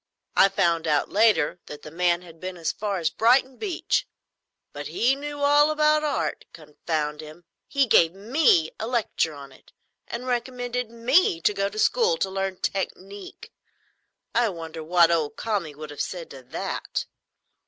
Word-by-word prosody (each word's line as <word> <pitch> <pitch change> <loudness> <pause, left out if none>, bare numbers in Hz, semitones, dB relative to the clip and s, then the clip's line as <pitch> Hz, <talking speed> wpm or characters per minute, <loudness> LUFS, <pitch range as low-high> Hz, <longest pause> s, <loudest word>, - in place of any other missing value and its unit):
I 195 - +6
found 170 -4 +1
out, 150 -2 +1
later, 200 -7 +3
that 150 0 -9
the 155 - -9
man 175 +1 +1
had 165 -2 -14
been 185 +1 -6
as 165 -2 -1
far 205 -2 -3
as 165 -3 0
Brighton 255 +3 +3
beach; 395 -6 -1 0.7
but - - -6
he 255 +3 +2
knew 290 +1 -6
all 290 +1 +5
about 305 0 +3
Art, 295 -1 -2
confound 150 -1 -4
him. 155 +3 -12 0.2
He 280 -1 +2
gave 165 -8 +5
me 205 - +3
a 220 - -3
lecture 225 -10 -1
on 140 -1 -11
it, 130 - -20 0.4
and 240 +2 -5
recommended 245 -1 -2
me 235 - +2
to 210 - +2
go 200 0 -1
to 215 - -11
school 475 - +2
to 190 - -1
learn 195 -1 -2
technique. 195 +1 -5 0.8
I 235 -1 +3
wonder 165 -3 -7
what 170 +1 +4
old 160 -3 0
Kami 195 -9 -3
would 155 0 -8
have 145 - -5
said 175 -3 -5
to 135 - -10
that." 125 - -4
195 Hz, 165 wpm, -25 LUFS, 165-250 Hz, 0.8 s, I